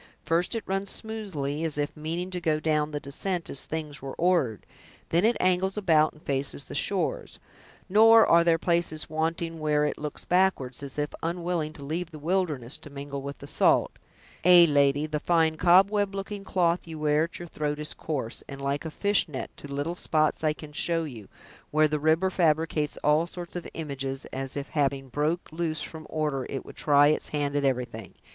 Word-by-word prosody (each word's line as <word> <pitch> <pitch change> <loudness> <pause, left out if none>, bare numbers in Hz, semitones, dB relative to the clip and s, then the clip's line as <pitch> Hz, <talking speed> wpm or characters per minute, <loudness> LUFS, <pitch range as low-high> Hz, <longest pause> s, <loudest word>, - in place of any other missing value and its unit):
First 170 +7 0
it 225 - -2
runs 195 +1 -2
smoothly, 175 -10 -3
as 160 -3 0
if 145 0 -2
meaning 165 +4 -4
to 180 -1 -3
go 155 -2 +1
down 155 -1 +1
the 150 -1 -4
descent 170 +6 -2
as 140 - +1
things 155 -2 -5
were 135 0 -6
ordered; 165 - +1 0.4
then 170 +3 +2
it 235 +1 +3
angles 185 +2 +1
about 160 -6 +3
and 155 - -20
faces 135 - -2
the - - -9
shores; - - -1 0.5
nor 225 +3 +7
are 170 0 +5
there 170 -1 +3
places 170 -3 0
wanting 165 +1 -2
where 150 -1 +2
it 150 - -2
looks 150 0 -5
backward, 180 -9 +2
as 140 -1 -8
if 150 0 -1
unwilling 170 -2 -2
to 145 - -10
leave 165 +4 -3
the 155 - -10
wilderness, 150 -6 -1
to - - -11
mingle 140 0 -6
with 140 +1 -6
the 140 - -10
salt. - - +3 0.5
Ay, 175 -1 +8
lady, 145 0 +3
the 155 -1 -2
fine 160 0 +2
cobweb 195 +4 +4
looking 200 +1 -5
cloth 175 -3 +1
you 160 -1 -7
wear 150 +1 +2
at 170 - -9
your 175 - -8
throat 150 -2 -3
is 150 0 -4
coarse, 135 -7 -4
and 140 - -7
like 140 +2 -2
a - - -2
fishnet, 185 -5 -1
to - - -9
little 145 +4 -2
spots 155 -3 0
I 155 -1 +2
can 150 -1 -11
show 165 +2 0
you, 120 -10 -8 0.4
where 155 +1 +4
the 150 0 -1
river 160 +5 +2
fabricates 155 -3 +1
all 150 +3 +3
sorts 175 0 -8
of 175 - -5
images, 135 -3 -4
as 135 +1 -4
if 140 0 -5
having 135 -2 -1
broke 150 +6 -1
loose 160 -2 -2
from 160 -1 -8
order, 150 -4 -2
it 135 - -5
would - - -11
try 145 -1 +5
its 155 - 0
hand 145 -1 -1
at 145 - +1
everything. 120 -5 -2
155 Hz, 195 wpm, -27 LUFS, 145-175 Hz, 0.5 s, Ay